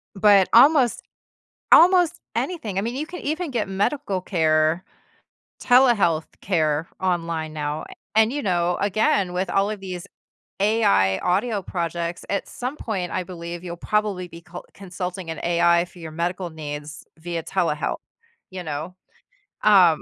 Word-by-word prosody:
But 200 -1 +5
almost 260 0 +5 0.7
almost 355 -1 +6
anything, 230 - -3
I - - +3
mean, 235 +5 -3
you 300 +3 -3
can 355 +2 -8
even 315 +1 -3
get 230 -5 -2
medical 200 +1 -1
care, 160 -1 +1 0.8
telehealth 235 -11 +4 0.2
care 160 -4 0
online 165 -4 -2
now, 150 0 -3
a - - -11 0.2
and, 220 +1 +5
you 290 +2 -2
know, 175 -4 0
again, 200 -2 +1
with 180 +1 -2
all 195 +3 +1
of 210 -2 -5
these 180 -2 -7 0.5
AI 100 - +3
audio 205 +3 0
projects, 170 -1 -4
at 200 - -2
some 255 +4 -5
point, 195 -10 -4
I - - -1
believe 170 -1 -7
you'll 175 -1 -6
probably 205 -1 -1
be 170 -1 -12
col 175 +1 -10
consulting 180 -2 -6
an 160 - -5
AI 170 0 +3
for 180 0 -17
your 160 -1 -7
medical 175 +2 -3
needs 150 -1 -7 0.2
via 170 0 -4
telehealth, 165 -6 -1 0.5
you 185 -1 -6
know. 155 +4 -5 0.7
Um 185 -7 +6
180 Hz, 145 wpm, -23 LUFS, 170-210 Hz, 0.8 s, almost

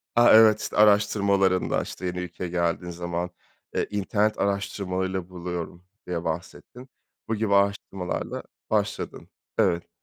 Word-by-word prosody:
a, 120 0 +7
evet, 110 -1 +7
işte, - - -4
araştırmalarında, 100 -2 +3
işte, 90 - -7
yeni 90 0 -2
ülkeye 90 0 -5
geldiğin 85 0 -1
zaman, 85 0 -3 0.5
eee, - - 0
internet 105 +1 0
araştırmalarıyla 95 -2 -2
buluyorum 90 -1 -6 0.2
diye 85 -1 -2
bahsettin. 95 +10 -6 0.4
Bu 115 - 0
gibi 105 -1 0
araştırmalarla 100 -2 -1 0.3
başladın. - - -2 0.3
Evet. 85 -2 +2
95 Hz, 120 wpm, -26 LUFS, 90-100 Hz, 0.5 s, a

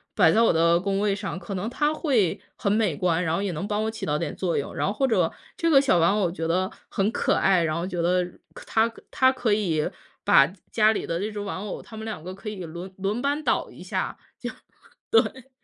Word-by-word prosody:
摆 180 -7 +6
在 225 - +4
我 230 - +5
的 170 +1 +4
工 195 +1 0
位 205 -1 +1
上， 195 -3 -4
可 180 +2 -7
能 195 +4 -2
它 295 +4 +1
会 255 - +1 0.2
很 - - 0
美 210 -5 +2
观， 180 0 +1
然 160 -1 0
后 180 - 0
也 200 -2 -1
能 160 +4 -3
帮 210 +1 -1
我 - - 0
起 220 - -5
到 150 0 0
点 165 -2 -3
作 180 -3 -1
用。 140 - -3
然 - - 0
后 - - +1
或 265 +6 +1
者 185 -8 +2 0.2
这 335 - +1
个 285 -4 +7
小 270 -10 +3
玩 170 +4 +4
偶 185 -4 +2
觉 165 -1 -4
得 185 +3 +1 0.2
很 200 0 +1
可 - - +1
爱， 185 -3 +3
然 155 -1 0
后 170 +3 -2
觉 180 -3 -2
得 180 +1 +2 0.4
它 225 +1 +2 0.2
它 260 0 +4
可 245 -5 0
以 170 -8 +1 0.4
把 135 - +7 0.3
家 215 -1 +5
里 220 - -2
的 165 0 -1
这 215 - -2
只 210 - -5
玩 200 -2 -4
偶， 205 0 -5
它 220 - -12
们 220 - -6
两 220 -8 -5
个 185 +3 -7
可 210 +2 -7
以 190 -4 -6
轮 170 +4 -8
轮 200 +5 -1
班 285 +2 0
倒 - - 0
一 - - -13
下， - - -3 0.2
就， - - -3 0.6
对。 270 - +2
195 Hz, 265 characters per minute, -25 LUFS, 170-220 Hz, 0.6 s, 个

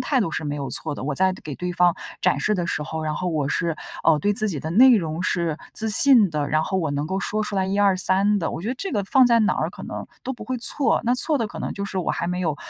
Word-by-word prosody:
态 275 - 0
度 205 -9 0
是 155 - -4
没 145 0 -3
有 140 -3 -5
错 - - -2
的， 130 - -7
我 145 +1 -2
在 190 +4 +2
给 155 -6 -8
对 180 +5 -4
方 175 -1 +3 0.3
展 - - +2
示 215 - +1
的 175 -3 -2
时 155 - -2
候， 160 +1 -5
然 155 0 -2
后 180 +3 -3
我 155 -5 -1
是， 165 -1 -1 0.3
哦， 160 -2 +4
对 205 +8 +1
自 215 +1 0
己 160 -7 -3
的 155 - -5
内 245 +6 +7
容 165 -2 -3
是 170 -4 -1 0.2
自 220 0 +1
信 230 -3 +7
的， 150 -2 -2
然 155 +1 +1
后 190 - -1
我 160 -5 -1
能 145 +1 -2
够 190 +3 -2
说 215 +2 -2
出 210 - -5
来 190 -1 0
一 195 +1 -1
二 200 -2 +4
三 195 +3 +2
的。 165 - -2
我 - - -5
觉 215 - -4
得 255 - -1
这 390 +8 -5
个 205 -4 0
放 260 +6 +4
在 235 -1 +4
哪 215 - +2
儿 - - -2
可 - - -11
能 - - -7 0.2
都 265 - -4
不 230 -4 -9
会 255 +4 -3
错， 275 +4 0
那 240 +2 +2
错 295 +3 0
的 230 - -1
可 - - -10
能 - - -4
就 200 - -5
是 195 - -6
我 175 - -1
还 - - -2
没 180 +1 -2
有 160 -5 -1
190 Hz, 330 characters per minute, -23 LUFS, 160-215 Hz, 0.3 s, 内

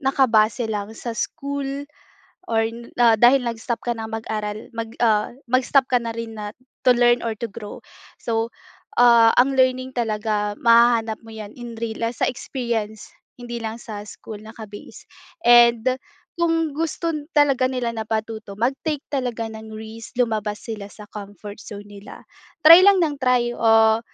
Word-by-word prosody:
nakabase 245 -4 +2
lang 215 0 -4
sa 235 - -5
school 280 +4 -4 0.7
or 225 -1 +2
n 230 +1 -7
dahil 240 +2 +5
nag-stop 235 0 -3
ka 240 - 0
nang 220 0 -6
mag-aral, 215 -1 -4
mag 225 -1 -4
ah, 215 -3 +2 0.2
mag-stop 255 +2 +2
ka 250 -1 +2
na 230 - -3
rin 230 -1 -6
na 210 -1 -6 0.3
to 255 - +6
learn 240 0 +3
or 230 - -1
to 235 - -4
grow. 210 0 -9 0.4
So, 225 0 -2 0.5
ah, 235 -2 +7
ang 270 +2 +3
learning 255 0 +1
talaga 210 -3 -1
mahahanap 230 -1 +4
mo 225 - -12
'yan 215 -1 -9
in 235 -2 -9
real, 230 0 -4
ah, 230 - 0
sa 240 - -1
experience, 230 -5 -4 0.3
hindi 240 -1 -6
lang 225 +1 -5
sa 210 -3 -7
school 210 0 -10
naka-base. 215 -1 -11 0.4
And 240 +1 +6 0.4
kung 330 -2 +1
gusto 330 +2 -2 0.2
talaga 275 -3 +4
nila 250 -2 -2
na 220 -1 -5
patuto, 220 -2 -4
mag-take 275 +6 -2
talaga 250 -4 -2
ng 220 0 -9
risk, 220 +1 -10
lumabas 220 -4 -1
sila 215 -3 -6
sa 210 - -13
comfort 205 0 -9
zone 205 -2 -9 0.2
nila. 205 - -12 0.4
Try 330 +3 +11
lang 400 +1 +6
ng 295 -3 -2
try. 250 -2 +2
Ah 225 -1 +5
230 Hz, 155 wpm, -22 LUFS, 220-250 Hz, 0.7 s, Try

